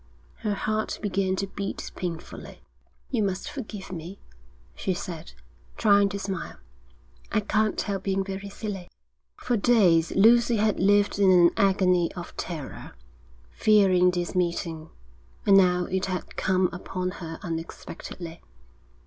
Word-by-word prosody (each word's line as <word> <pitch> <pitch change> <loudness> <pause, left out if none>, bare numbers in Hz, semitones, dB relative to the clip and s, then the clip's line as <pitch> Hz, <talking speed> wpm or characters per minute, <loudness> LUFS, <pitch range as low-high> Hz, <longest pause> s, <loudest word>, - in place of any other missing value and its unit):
Her 210 -2 -2
heart 215 +2 -2
began 195 -2 0
to 195 - -1
beat 195 0 -5
painfully. 170 -3 -7 0.5
'You 240 -4 +1
must 190 -2 -2
forgive 215 -8 -7
me,' 175 +2 -7 0.5
she 185 - -2
said, 170 - -7 0.4
trying 200 -1 +4
to 200 - -4
smile. 195 -3 -5 0.8
'I 215 - +2
can't 215 0 0
help 200 -2 -2
being 195 0 0
very 195 +1 -6
silly.' 200 -3 -6 0.5
For 245 - -1
days 195 -8 +4
Lucy 235 +4 +5
had 215 -1 +1
lived 205 +1 +3
in 195 -2 +5
an 175 -2 +6
agony 185 -3 +3
of 175 -1 -8
terror, 160 -6 -6 0.6
fearing 190 - +4
this 175 -1 -2
meeting, 170 -3 -2 0.6
and 200 - +6
now 180 -2 +4
it 190 +1 -1
had 185 -1 -4
come 185 -1 +2
upon 185 +1 -4
her 165 -1 -6
unexpectedly. 165 0 -7
190 Hz, 130 wpm, -26 LUFS, 180-205 Hz, 0.8 s, an